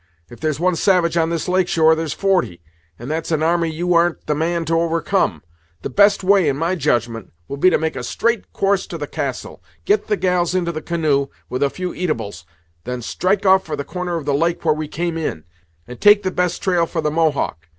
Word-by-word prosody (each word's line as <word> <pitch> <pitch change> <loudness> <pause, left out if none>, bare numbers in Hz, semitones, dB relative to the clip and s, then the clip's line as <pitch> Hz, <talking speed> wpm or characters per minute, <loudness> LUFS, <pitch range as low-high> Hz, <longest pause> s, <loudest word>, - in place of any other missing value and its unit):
If 120 - -12
there's 155 -2 -2
one 180 +1 +2
savage 175 -1 +2
on 165 -1 +2
this 170 -2 -2
lake 185 0 +2
shore, 160 -2 +4
there's 160 -1 -2
forty, 185 - 0 0.3
and 120 - -9
that's 160 +1 -3
an 155 -1 +1
army 170 0 +1
you 175 +3 -1
ar'n't 170 0 +1
the 150 - 0
man 165 +2 -1
to 165 +1 +1
overcome. 165 - 0 0.4
The - - -4
best 200 -1 +4
way, 190 -4 +4
in 135 - -1
my 165 +4 0
judgment, 120 - -1 0.2
will 140 - -5
be 185 +6 +5
to - - +2
make 160 0 -2
a - - -4
straight 235 -3 -1
course 195 -1 0
to 170 - -6
the 150 - -4
castle; 140 - -5 0.2
get 210 - +1
the 210 - +1
gals 180 -1 0
into 175 -2 0
the 155 -1 -5
canoe, 155 -5 0 0.2
with 125 - -3
a 140 - +3
few 180 +4 -5
eatables; 110 - -4 0.4
then 125 0 -5
strike 190 - -1
off 190 0 +5
for 155 - -4
the 140 - -4
corner 180 -1 -4
of 160 -4 -4
the 145 - 0
lake 170 +4 0
where 155 - +4
we 155 0 -4
came 170 +1 -3
in, 80 - -4 0.4
and 125 0 -10
take 205 0 +6
the 185 - -1
best 180 -1 -1
trail 175 -3 +2
for 160 - -3
the 150 -1 -1
Mohawk. 150 - -1
165 Hz, 225 wpm, -20 LUFS, 150-180 Hz, 0.4 s, take